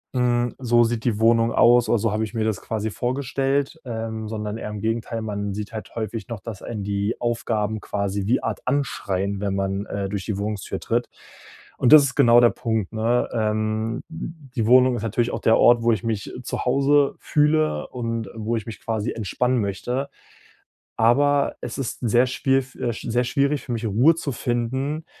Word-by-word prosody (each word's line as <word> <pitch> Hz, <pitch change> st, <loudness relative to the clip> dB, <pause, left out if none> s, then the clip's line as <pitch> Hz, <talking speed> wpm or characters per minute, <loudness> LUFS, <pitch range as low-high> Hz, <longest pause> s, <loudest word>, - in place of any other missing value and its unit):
hm, 120 Hz, -1 st, +1 dB
so 120 Hz, -2 st, +3 dB
sieht 115 Hz, 0 st, -2 dB
die 110 Hz, -4 st, 0 dB
Wohnung 115 Hz, 0 st, +4 dB
aus 120 Hz, 0 st, +5 dB
oder 120 Hz, -, +4 dB
so 115 Hz, +1 st, 0 dB
habe 110 Hz, +1 st, 0 dB
ich 110 Hz, -, -5 dB
mir 110 Hz, -2 st, -1 dB
das 110 Hz, -3 st, -1 dB
quasi 110 Hz, -1 st, -3 dB
vorgestellt.”, 135 Hz, +4 st, -1 dB
ähm, 110 Hz, -2 st, -4 dB
sondern 105 Hz, -1 st, -4 dB
eher 110 Hz, -, -5 dB
im 105 Hz, -1 st, -6 dB
Gegenteil, 115 Hz, 0 st, -2 dB
man 100 Hz, -2 st, -3 dB
sieht 105 Hz, +2 st, -6 dB
halt 110 Hz, -, -7 dB
häufig 110 Hz, -1 st, -4 dB
noch, 115 Hz, -3 st, -5 dB
dass 105 Hz, 0 st, -8 dB
einen 105 Hz, -4 st, -5 dB
die 100 Hz, +2 st, -1 dB
Aufgaben 110 Hz, -3 st, -1 dB
quasi 100 Hz, -1 st, -2 dB
wie 120 Hz, -, +2 dB
Art -, -, -3 dB
anschreien, 100 Hz, -8 st, -1 dB
wenn 100 Hz, -1 st, -1 dB
man, 95 Hz, +1 st, -2 dB
äh, 100 Hz, -1 st, -3 dB
durch 100 Hz, -1 st, -3 dB
die 105 Hz, -3 st, -2 dB
Wohnungstür 105 Hz, 0 st, -3 dB
tritt. -, -, -1 dB, 0.7 s
Und 125 Hz, -, +2 dB
das 155 Hz, -2 st, +10 dB
ist 135 Hz, -3 st, -2 dB
genau 120 Hz, -4 st, +6 dB
der 120 Hz, -, +6 dB
Punkt, 110 Hz, -4 st, -2 dB
ne? 115 Hz, +2 st, +1 dB
Ähm, 110 Hz, +1 st, -1 dB
die 150 Hz, -7 st, -5 dB
Wohnung 130 Hz, 0 st, +6 dB
ist 115 Hz, -, -4 dB
natürlich 115 Hz, +2 st, 0 dB
auch -, -, -3 dB
der 110 Hz, -, +4 dB
Ort, 120 Hz, -1 st, +5 dB
wo 120 Hz, -, +4 dB
ich 110 Hz, -, -1 dB
mich 110 Hz, -3 st, -3 dB
zu -, -, -3 dB
Hause 140 Hz, +2 st, +3 dB
fühle 150 Hz, -, +1 dB
und 115 Hz, -3 st, -4 dB
wo 110 Hz, +1 st, -2 dB
ich 110 Hz, -2 st, -3 dB
mich 115 Hz, -, -8 dB
quasi 110 Hz, 0 st, -2 dB
entspannen 125 Hz, +4 st, 0 dB
möchte. 125 Hz, +7 st, -3 dB, 0.9 s
Aber 140 Hz, +5 st, +3 dB
es -, -, -5 dB
ist 135 Hz, -4 st, -4 dB
sehr 120 Hz, +1 st, +3 dB
schwier 135 Hz, +1 st, +1 dB
f 130 Hz, -1 st, -9 dB
äh, 120 Hz, -, -2 dB
sehr 120 Hz, +2 st, -1 dB
schwierig 140 Hz, +3 st, +1 dB
für -, -, -7 dB
mich, 115 Hz, 0 st, -3 dB
Ruhe 120 Hz, +10 st, +4 dB
zu 155 Hz, -3 st, -3 dB
finden, 130 Hz, +6 st, -2 dB
115 Hz, 195 wpm, -23 LUFS, 110-125 Hz, 0.9 s, das